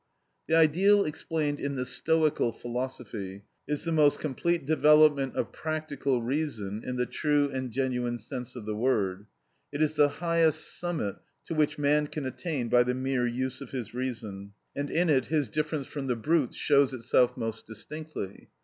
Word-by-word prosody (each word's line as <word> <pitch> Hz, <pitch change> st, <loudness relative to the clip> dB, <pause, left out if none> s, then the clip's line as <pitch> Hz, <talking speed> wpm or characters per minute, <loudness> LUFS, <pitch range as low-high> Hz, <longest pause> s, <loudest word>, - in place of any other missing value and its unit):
The 160 Hz, -, +3 dB
ideal 185 Hz, +6 st, +5 dB
explained 150 Hz, -1 st, -2 dB
in 140 Hz, 0 st, -2 dB
the 130 Hz, -1 st, -2 dB
Stoical 155 Hz, -4 st, +1 dB
philosophy 120 Hz, -6 st, -5 dB, 0.2 s
is 150 Hz, 0 st, -1 dB
the 165 Hz, -, -1 dB
most 150 Hz, -3 st, +4 dB
complete 160 Hz, +2 st, -1 dB
development 150 Hz, -2 st, +5 dB
of -, -, -1 dB
practical 145 Hz, -5 st, -2 dB
reason 115 Hz, -7 st, -2 dB
in 125 Hz, -, -4 dB
the 125 Hz, 0 st, 0 dB
true 145 Hz, +1 st, +1 dB
and 130 Hz, -1 st, -3 dB
genuine 125 Hz, -1 st, -1 dB
sense 125 Hz, +2 st, -7 dB
of 120 Hz, -4 st, -7 dB
the 105 Hz, -, -2 dB
word; 105 Hz, -4 st, 0 dB, 0.4 s
it 145 Hz, -, -4 dB
is 155 Hz, 0 st, +1 dB
the 145 Hz, -1 st, +6 dB
highest 165 Hz, -1 st, 0 dB
summit 165 Hz, -, -2 dB, 0.3 s
to -, -, -4 dB
which 155 Hz, -2 st, +1 dB
man 150 Hz, +1 st, +2 dB
can 150 Hz, -1 st, -5 dB
attain 130 Hz, -1 st, -3 dB
by 120 Hz, +1 st, +5 dB
the 125 Hz, +1 st, +1 dB
mere 130 Hz, -1 st, 0 dB
use 130 Hz, +2 st, -3 dB
of 135 Hz, -, -8 dB
his 120 Hz, -5 st, -5 dB
reason, 110 Hz, -6 st, -5 dB, 0.2 s
and 145 Hz, 0 st, -2 dB
in 175 Hz, +2 st, +2 dB
it 135 Hz, -5 st, +3 dB
his 150 Hz, -6 st, 0 dB
difference 150 Hz, +1 st, -2 dB
from 140 Hz, -1 st, -5 dB
the 125 Hz, -, +1 dB
brutes 145 Hz, +3 st, +1 dB
shows 140 Hz, -2 st, +3 dB
itself 125 Hz, +1 st, +2 dB
most 115 Hz, 0 st, -4 dB
distinctly. 115 Hz, -1 st, -7 dB
135 Hz, 170 wpm, -28 LUFS, 120-155 Hz, 0.4 s, the